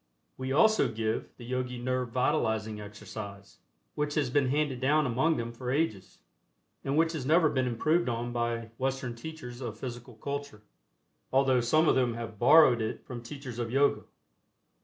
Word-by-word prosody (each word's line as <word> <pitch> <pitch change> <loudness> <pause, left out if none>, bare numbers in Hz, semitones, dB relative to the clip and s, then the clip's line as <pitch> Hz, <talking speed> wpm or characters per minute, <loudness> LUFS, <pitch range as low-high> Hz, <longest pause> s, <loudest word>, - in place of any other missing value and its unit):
We 130 0 -4
also 220 - +4
give 110 0 -2
the 120 - -10
Yogi 125 0 -3
Nerve 130 0 -1
Vitalizing 110 -5 0
Exercise, 100 -1 -9 0.3
which 150 0 -2
has 140 -5 +1
been 140 -1 +3
handed 140 -2 0
down 150 +3 +3
among 140 +6 +2
them 115 0 -3
for 125 +1 -6
ages, 130 - -1 0.7
and 140 +2 -1
which 165 0 +3
has 160 -5 -4
never 155 +3 +4
been 130 -2 0
improved 155 +7 +1
on 120 +1 -3
by 120 -1 -2
Western 130 -2 -1
teachers 125 -1 -8
of 115 -4 -5
Physical 120 -1 -7
Culture, 140 -2 -6 0.7
although 130 -1 +3
some 155 +7 +3
of - - +5
them 125 -3 +1
have 115 -3 -7
"borrowed" 125 -3 +7
it 110 - -4
from 120 -2 -7
teachers 125 -1 -8
of 120 -1 -2
Yoga. 140 +4 +2
125 Hz, 165 wpm, -29 LUFS, 115-145 Hz, 0.7 s, borrowed